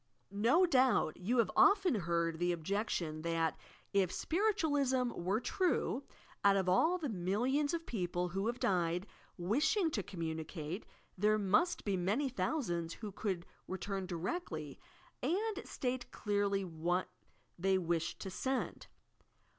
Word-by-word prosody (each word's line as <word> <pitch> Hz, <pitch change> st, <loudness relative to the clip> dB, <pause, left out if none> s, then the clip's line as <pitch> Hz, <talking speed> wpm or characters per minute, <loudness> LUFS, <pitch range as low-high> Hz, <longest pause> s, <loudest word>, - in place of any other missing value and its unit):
No 235 Hz, -, +4 dB
doubt 260 Hz, -, +3 dB
you 220 Hz, +8 st, 0 dB
have 230 Hz, -, +3 dB
often 395 Hz, -1 st, +5 dB
heard 170 Hz, -4 st, 0 dB
the 175 Hz, 0 st, +2 dB
objection, 170 Hz, -2 st, -2 dB
that, 165 Hz, 0 st, 0 dB, 0.4 s
if 190 Hz, -3 st, +3 dB
Spiritualism 290 Hz, -, +1 dB
were 190 Hz, +3 st, -1 dB
true, 325 Hz, -, 0 dB, 0.4 s
out 200 Hz, -1 st, +6 dB
of 190 Hz, -1 st, 0 dB
all 315 Hz, -, +4 dB
the 320 Hz, -5 st, -3 dB
millions 245 Hz, -, 0 dB
of 330 Hz, -1 st, -3 dB
people 180 Hz, -4 st, -2 dB
who 195 Hz, +4 st, -1 dB
have 240 Hz, +1 st, -2 dB
died, 175 Hz, -1 st, +1 dB, 0.3 s
wishing 300 Hz, -, +2 dB
to 215 Hz, -, -1 dB
communicate, 165 Hz, 0 st, -5 dB, 0.3 s
there 210 Hz, +2 st, +4 dB
must 215 Hz, -, +2 dB
be 200 Hz, -2 st, +1 dB
many 210 Hz, +11 st, +1 dB
thousands 175 Hz, -, -1 dB
who 215 Hz, -3 st, -6 dB
could 190 Hz, -3 st, -3 dB, 0.2 s
return 190 Hz, 0 st, -3 dB
directly 170 Hz, -, -4 dB, 0.4 s
and 405 Hz, -, 0 dB
slate 250 Hz, -1 st, -3 dB
clearly 200 Hz, -2 st, 0 dB
what 175 Hz, +2 st, -1 dB, 0.5 s
they 190 Hz, +1 st, +3 dB
wished 170 Hz, -2 st, -1 dB
to 190 Hz, -, -5 dB
send! 260 Hz, +7 st, -2 dB
200 Hz, 130 wpm, -35 LUFS, 175-265 Hz, 0.5 s, out